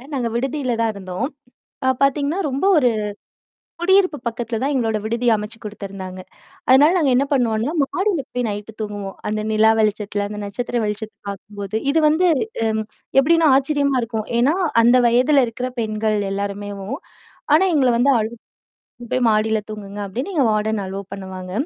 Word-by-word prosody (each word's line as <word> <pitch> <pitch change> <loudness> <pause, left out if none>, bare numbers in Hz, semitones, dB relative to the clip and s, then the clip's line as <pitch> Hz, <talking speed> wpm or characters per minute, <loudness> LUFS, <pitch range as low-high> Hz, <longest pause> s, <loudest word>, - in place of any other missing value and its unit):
நாங்க 245 -3 -1
விடுதியில 260 0 -1
தான் 225 -1 +2
இருந்தோம். 185 +2 -4 0.6
அ - - +4
பார்த்தீங்கன்னா, 285 +6 +1
ரொம்ப 270 +6 -2
ஒரு 250 -4 +4 0.9
குடியிருப்பு 370 -3 +3
பக்கத்தில 230 -1 -3
தான் 285 +2 0
எங்களோட 225 -4 +1
விடுதி 235 +2 -1
அமைச்சு 210 +2 -6
குடுத்துருந்தாங்க. 195 -3 -7 0.5
அதனால 285 +5 +7
நாங்க 285 -5 +2
என்ன 275 - +3
பண்ணுவோன்னா, 235 +2 +1
மாடியில 370 0 -1
போய் 245 -1 -1
நைட்டு 210 +1 -6
தூங்குவோம். 205 -2 -5
அந்த 215 0 -1
நிலா 220 +1 +5
வெளிச்சதுல, 210 -1 -1
அந்த 210 0 -6
நட்சத்திர 240 +4 -2
வெளிச்சத்த 210 +1 -4
பார்க்கும்போது. 200 +1 -7 0.2
இது 320 +2 +3
வந்து 335 +4 +3 0.4
அம் 220 0 0 0.4
எப்படின்னா 330 +3 +4
ஆச்சரியமா 280 -1 +1
இருக்கும். 220 -2 -3
ஏன்னா 275 +7 +3 0.3
அந்த 240 +2 +6
வயதல 255 +3 +4
இருக்கிற 250 +3 -4
பெண்கள் 215 -1 0
எல்லாருமேவும் 200 +3 -4 0.6
ஆனா 330 +5 +5
எங்கள 265 -4 +4
வந்து 260 +4 +4
அழு 220 +1 -2 0.7
இங்க 240 - -9
போய் 255 -1 +2
மாடியில 220 0 +2
தூங்குங்க 205 -1 -7
அப்டின்னு 250 - -4
எங்க 300 - +3
வார்டன் 215 0 0
அலோ 190 +1 -5
பண்ணுவாங்க. 190 -2 -7
225 Hz, 150 wpm, -21 LUFS, 210-270 Hz, 0.9 s, அதனால